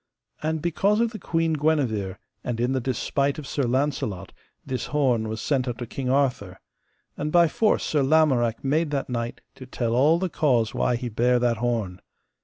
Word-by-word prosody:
And 155 Hz, 0 st, -2 dB
because 195 Hz, +5 st, +1 dB
of 230 Hz, -1 st, +1 dB
the 215 Hz, -, -7 dB
Queen 165 Hz, -2 st, 0 dB
Guenever, 130 Hz, -11 st, 0 dB, 0.3 s
and 120 Hz, -2 st, -3 dB
in 120 Hz, +2 st, +1 dB
the 130 Hz, -1 st, 0 dB
despite 135 Hz, +3 st, -1 dB
of 155 Hz, -, -7 dB
Sir 140 Hz, 0 st, -1 dB
Launcelot, 130 Hz, -7 st, -1 dB, 0.3 s
this 130 Hz, -1 st, -3 dB
horn 125 Hz, -7 st, +1 dB
was 110 Hz, 0 st, -4 dB
sent 135 Hz, -3 st, 0 dB
unto 120 Hz, 0 st, -4 dB
King 125 Hz, +2 st, -4 dB
Arthur; 125 Hz, -9 st, 0 dB, 0.6 s
and 150 Hz, +1 st, -3 dB
by 170 Hz, 0 st, +5 dB
force 215 Hz, +7 st, +1 dB
Sir 150 Hz, -, +1 dB
Lamorak 135 Hz, -6 st, +2 dB
made 150 Hz, +4 st, +1 dB
that 140 Hz, -2 st, -2 dB
knight 120 Hz, -1 st, -3 dB
to 130 Hz, -, -12 dB
tell 120 Hz, -2 st, -2 dB
all 145 Hz, +7 st, +4 dB
the 185 Hz, +2 st, -1 dB
cause 125 Hz, -9 st, +1 dB
why 125 Hz, -, +1 dB
he 120 Hz, +1 st, -4 dB
bare 120 Hz, +2 st, +2 dB
that 120 Hz, -1 st, +1 dB
horn. 110 Hz, -6 st, -2 dB
130 Hz, 185 wpm, -25 LUFS, 120-150 Hz, 0.6 s, by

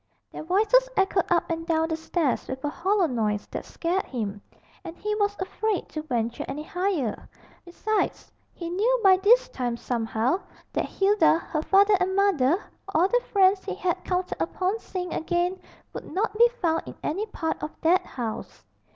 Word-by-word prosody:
Their -, -, -7 dB
voices 440 Hz, +9 st, +3 dB
echoed 385 Hz, -2 st, +1 dB
up 345 Hz, -1 st, +3 dB
and 330 Hz, 0 st, -2 dB
down 320 Hz, -1 st, +1 dB
the 320 Hz, -, 0 dB
stairs 320 Hz, -3 st, -1 dB
with 260 Hz, 0 st, -6 dB
a -, -, +1 dB
hollow 375 Hz, +5 st, +1 dB
noise 215 Hz, -7 st, -1 dB
that -, -, -5 dB
scared 355 Hz, +3 st, -2 dB
him, 210 Hz, -5 st, -4 dB, 0.4 s
and 340 Hz, -1 st, -8 dB
he 425 Hz, +1 st, -2 dB
was 410 Hz, -1 st, +1 dB
afraid 385 Hz, +1 st, -2 dB
to 310 Hz, -, -4 dB
venture 235 Hz, -6 st, -2 dB
any 300 Hz, +2 st, -5 dB
higher. 350 Hz, -, -2 dB, 0.4 s
Besides, 415 Hz, +4 st, -2 dB, 0.2 s
he 340 Hz, -, -7 dB
knew 460 Hz, +7 st, +2 dB
by 380 Hz, -1 st, +7 dB
this 440 Hz, +6 st, +5 dB
time 245 Hz, -2 st, -3 dB
somehow 235 Hz, -, 0 dB, 0.3 s
that -, -, 0 dB
Hilda, 390 Hz, -5 st, +3 dB
her 310 Hz, -2 st, -3 dB
father 400 Hz, +5 st, +4 dB
and 370 Hz, +1 st, 0 dB
mother, 365 Hz, -6 st, +3 dB, 0.3 s
all 340 Hz, +4 st, +4 dB
the -, -, +3 dB
friends 385 Hz, -1 st, +4 dB
he -, -, -4 dB
had 365 Hz, 0 st, -1 dB
counted 365 Hz, 0 st, -2 dB
upon 380 Hz, +4 st, -1 dB
seeing 360 Hz, -4 st, -5 dB
again, 350 Hz, +3 st, -1 dB, 0.3 s
would -, -, -8 dB
not 425 Hz, +3 st, -1 dB
be 475 Hz, +2 st, +6 dB
found 330 Hz, -4 st, +1 dB
in -, -, -8 dB
any 395 Hz, +8 st, -2 dB
part 320 Hz, -6 st, -3 dB
of 300 Hz, -, -3 dB
that 360 Hz, +3 st, +4 dB
house. 235 Hz, -8 st, -6 dB
360 Hz, 175 wpm, -26 LUFS, 310-395 Hz, 0.4 s, by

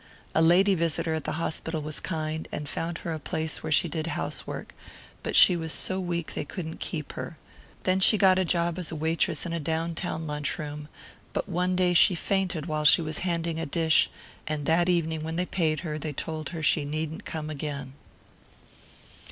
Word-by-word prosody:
A 160 Hz, -, +3 dB
lady 180 Hz, +5 st, +5 dB
visitor 165 Hz, -1 st, 0 dB
at 160 Hz, -, -3 dB
the -, -, -1 dB
hospital 160 Hz, 0 st, -2 dB
was 155 Hz, 0 st, -4 dB
kind, 160 Hz, -2 st, -3 dB
and 150 Hz, -, -4 dB
found 165 Hz, +3 st, -3 dB
her 165 Hz, -, -1 dB
a 160 Hz, -, -4 dB
place 160 Hz, +2 st, -3 dB
where 155 Hz, -, -4 dB
she 155 Hz, -, +5 dB
did 160 Hz, 0 st, -3 dB
housework; -, -, -4 dB, 0.5 s
but -, -, -3 dB
she 180 Hz, -, +8 dB
was 160 Hz, -2 st, -3 dB
so 185 Hz, +4 st, +1 dB
weak 170 Hz, -3 st, -3 dB
they -, -, -2 dB
couldn't 160 Hz, +2 st, -6 dB
keep 150 Hz, -5 st, -4 dB
her. 165 Hz, -, -6 dB, 0.5 s
Then 185 Hz, 0 st, +2 dB
she 215 Hz, +3 st, +6 dB
got 190 Hz, -2 st, +5 dB
a -, -, +3 dB
job 170 Hz, 0 st, +1 dB
as 175 Hz, -, -2 dB
waitress 160 Hz, 0 st, 0 dB
in 170 Hz, -, -3 dB
a 170 Hz, -, -1 dB
down 160 Hz, +2 st, -1 dB
town 165 Hz, -1 st, -3 dB
lunch 150 Hz, -1 st, -2 dB
room, 150 Hz, -1 st, -6 dB, 0.5 s
but -, -, -2 dB
one 180 Hz, 0 st, 0 dB
day 180 Hz, -1 st, +3 dB
she 180 Hz, +2 st, +6 dB
fainted 180 Hz, -3 st, -1 dB
while 155 Hz, -2 st, -1 dB
she 150 Hz, +2 st, +7 dB
was 155 Hz, -1 st, -2 dB
handing 170 Hz, -2 st, -1 dB
a 165 Hz, -, -2 dB
dish, 160 Hz, +2 st, +3 dB, 0.4 s
and 150 Hz, -2 st, -2 dB
that 170 Hz, +3 st, +3 dB
evening 160 Hz, -3 st, +1 dB
when 160 Hz, +1 st, -3 dB
they 180 Hz, +2 st, 0 dB
paid 160 Hz, -4 st, 0 dB
her 155 Hz, -3 st, -4 dB
they 155 Hz, -1 st, -4 dB
told 155 Hz, +2 st, -4 dB
her 165 Hz, -3 st, -5 dB
she 150 Hz, 0 st, +4 dB
needn't 155 Hz, +5 st, -3 dB
come 155 Hz, -1 st, -5 dB
again. 140 Hz, -3 st, -5 dB
160 Hz, 200 wpm, -27 LUFS, 155-175 Hz, 0.5 s, she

